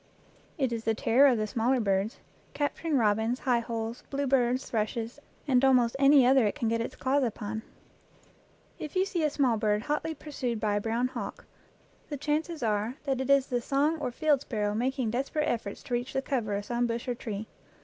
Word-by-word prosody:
It 265 Hz, -5 st, 0 dB
is 225 Hz, -1 st, -3 dB
the 225 Hz, 0 st, +1 dB
terror 255 Hz, +6 st, +5 dB
of 255 Hz, -4 st, +3 dB
the 215 Hz, -, 0 dB
smaller 235 Hz, +4 st, +1 dB
birds, 200 Hz, 0 st, 0 dB, 0.4 s
capturing 290 Hz, +1 st, 0 dB
robins, 220 Hz, +2 st, +1 dB
high 245 Hz, -2 st, +2 dB
holes, 230 Hz, 0 st, -4 dB
bluebirds, 265 Hz, -2 st, +1 dB
thrushes, 225 Hz, +3 st, -2 dB, 0.3 s
and 255 Hz, -2 st, +3 dB
almost 250 Hz, -3 st, +4 dB
any 275 Hz, -1 st, +6 dB
other 260 Hz, -3 st, +5 dB
it -, -, -2 dB
can 245 Hz, -6 st, -1 dB
get 230 Hz, 0 st, 0 dB
its 230 Hz, -, -4 dB
claws 275 Hz, +2 st, +1 dB
upon. 220 Hz, -2 st, -3 dB, 1.2 s
If 305 Hz, -, -7 dB
you 370 Hz, +1 st, +3 dB
see 360 Hz, -4 st, -2 dB
a 305 Hz, -, +3 dB
small 265 Hz, -6 st, +2 dB
bird 210 Hz, 0 st, +1 dB
hotly 300 Hz, +3 st, -2 dB
pursued 255 Hz, -6 st, -4 dB
by 210 Hz, -1 st, 0 dB
a -, -, -1 dB
brown 230 Hz, +3 st, 0 dB
hawk, -, -, -6 dB, 0.6 s
the 290 Hz, -, -3 dB
chances 300 Hz, +1 st, -2 dB
are 215 Hz, +2 st, 0 dB
that 270 Hz, -2 st, -1 dB
it 265 Hz, -, -4 dB
is 275 Hz, -1 st, +5 dB
the 245 Hz, -2 st, -1 dB
song 290 Hz, +6 st, +1 dB
or -, -, -2 dB
field 295 Hz, +1 st, +2 dB
sparrow 210 Hz, -6 st, -2 dB
making 250 Hz, +1 st, -1 dB
desperate 275 Hz, +5 st, -1 dB
efforts 225 Hz, -8 st, -3 dB
to -, -, -6 dB
reach 245 Hz, +2 st, -2 dB
the 270 Hz, -, -1 dB
cover 230 Hz, -8 st, -1 dB
of 200 Hz, 0 st, -3 dB
some 240 Hz, +1 st, 0 dB
bush 230 Hz, +1 st, -3 dB
or 245 Hz, -, 0 dB
tree. 220 Hz, -3 st, -5 dB
245 Hz, 200 wpm, -29 LUFS, 225-275 Hz, 1.2 s, any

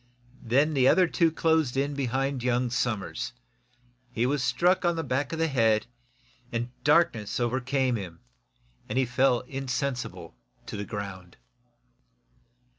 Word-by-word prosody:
Then 140 Hz, +6 st, +2 dB
the 130 Hz, -3 st, +4 dB
other 185 Hz, +5 st, +5 dB
two 165 Hz, -1 st, +2 dB
closed 160 Hz, -5 st, +1 dB
in 140 Hz, +1 st, 0 dB
behind 135 Hz, 0 st, -1 dB
young 125 Hz, 0 st, 0 dB
Somers. 120 Hz, -2 st, -2 dB, 0.8 s
He 120 Hz, 0 st, 0 dB
was 140 Hz, +2 st, 0 dB
struck 180 Hz, +8 st, +2 dB
on 175 Hz, -1 st, +2 dB
the 165 Hz, -, -2 dB
back 135 Hz, 0 st, -1 dB
of 165 Hz, -, -3 dB
the 165 Hz, -, +2 dB
head, 115 Hz, -6 st, +2 dB, 0.7 s
and 120 Hz, 0 st, -3 dB
darkness 145 Hz, -9 st, +2 dB
came 120 Hz, -, +1 dB
over 125 Hz, +2 st, -1 dB, 0.4 s
him 85 Hz, -3 st, -9 dB, 0.7 s
and -, -, -2 dB
he 130 Hz, -, +3 dB
fell 125 Hz, 0 st, +2 dB
insensible 135 Hz, -1 st, -4 dB, 0.3 s
to -, -, -7 dB
the 100 Hz, 0 st, -4 dB
ground. 100 Hz, -4 st, -7 dB
130 Hz, 140 wpm, -27 LUFS, 120-145 Hz, 0.8 s, other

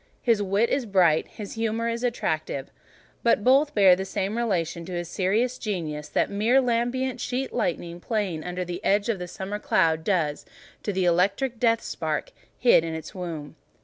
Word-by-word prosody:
His 230 Hz, -4 st, +3 dB
wit 205 Hz, +4 st, +1 dB
is 265 Hz, -4 st, 0 dB
bright, 175 Hz, -6 st, +3 dB
his 210 Hz, -2 st, -8 dB
humour 225 Hz, 0 st, -1 dB
attractive, 230 Hz, -, -2 dB, 0.5 s
but 230 Hz, -3 st, +3 dB
both 275 Hz, +5 st, +4 dB
bear 195 Hz, -3 st, +7 dB
the 190 Hz, -, -3 dB
same 195 Hz, +1 st, -2 dB
relation 175 Hz, -8 st, -1 dB
to 180 Hz, -, -7 dB
his 175 Hz, -1 st, -3 dB
serious 220 Hz, +8 st, 0 dB
genius 160 Hz, -8 st, -4 dB
that -, -, +1 dB
the -, -, -8 dB
mere 225 Hz, +6 st, +4 dB
lambent 250 Hz, +1 st, 0 dB
sheet 260 Hz, +2 st, -2 dB
lightning 170 Hz, 0 st, -2 dB
playing 190 Hz, -6 st, -2 dB
under 180 Hz, 0 st, -3 dB
the 175 Hz, +3 st, -6 dB
edge 205 Hz, +3 st, +2 dB
of 215 Hz, -5 st, 0 dB
the 180 Hz, -, -5 dB
summer 195 Hz, +3 st, -5 dB
cloud 160 Hz, -6 st, +2 dB
does 160 Hz, -6 st, 0 dB, 0.4 s
to 205 Hz, -, -2 dB
the 190 Hz, -1 st, 0 dB
electric 200 Hz, +8 st, +1 dB
death 230 Hz, -2 st, +2 dB
spark 155 Hz, -3 st, -3 dB, 0.3 s
hid 240 Hz, -9 st, +5 dB
in 165 Hz, -1 st, -3 dB
its 160 Hz, -, -7 dB
womb. 165 Hz, -5 st, -6 dB
195 Hz, 180 wpm, -25 LUFS, 175-230 Hz, 0.5 s, bear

